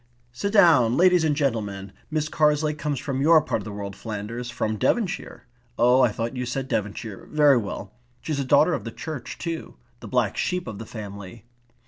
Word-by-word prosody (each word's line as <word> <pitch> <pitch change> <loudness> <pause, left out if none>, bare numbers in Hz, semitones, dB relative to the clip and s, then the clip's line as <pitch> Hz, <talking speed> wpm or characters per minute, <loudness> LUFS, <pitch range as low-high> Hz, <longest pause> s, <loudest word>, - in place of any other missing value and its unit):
"Sit 200 +12 -3
down, 145 - +5
ladies 180 -1 +5
and 155 -2 +2
gentlemen. 105 -9 -2 0.2
Miss 155 -1 -1
Carslake 150 -1 +1
comes 150 -2 -2
from 135 -1 -3
your 160 +2 +6
part - - -2
of - - -11
the 105 - -6
world, 100 -1 -6
Flanders. 115 +3 -5
From 110 -2 -2
Devonshire. 195 - -1 0.3
Oh, 125 +2 +5
I 125 -3 +4
thought 115 +3 -4
you 125 - -2
said 130 +2 -3
Devonshire. 105 -2 -4
Very 150 -3 +5
well. 100 -2 -5 0.3
She's 150 -3 -3
a - - 0
daughter 155 +6 +4
of - - -2
the 115 - -5
church 145 0 -7
too. 165 -2 -5 0.2
The - - -9
black - - 0
sheep 180 -1 -1
of 110 -3 -7
the 115 - -8
family. 100 0 -9
125 Hz, 190 wpm, -24 LUFS, 110-155 Hz, 0.3 s, your